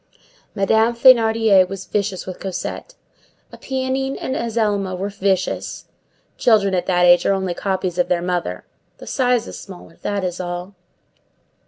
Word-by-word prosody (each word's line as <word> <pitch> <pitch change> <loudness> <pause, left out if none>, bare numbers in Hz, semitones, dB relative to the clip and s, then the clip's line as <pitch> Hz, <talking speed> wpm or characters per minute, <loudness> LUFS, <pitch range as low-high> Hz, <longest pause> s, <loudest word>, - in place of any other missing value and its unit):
Madame 220 +4 +2
Thénardier 225 -6 +5
was 195 -1 -6
vicious 200 -2 -2
with 185 - -7
Cosette. 195 - -5 0.6
Éponine 265 0 -2
and 260 - -3
Azelma 210 -5 -1
were 195 +2 -3
vicious. 195 -2 -2 0.5
Children 210 -5 +3
at 180 -1 -1
that 180 -1 +3
age 175 0 +6
are - - +3
only 190 -2 -1
copies 185 -1 -2
of 180 - +2
their 180 - +1
mother. 175 - -3 0.3
The - - -11
size 245 -3 +1
is - - -8
smaller; 180 -4 -12
that 200 -1 -2
is 180 -1 -3
all. 175 +1 -5
195 Hz, 145 wpm, -20 LUFS, 180-225 Hz, 0.6 s, age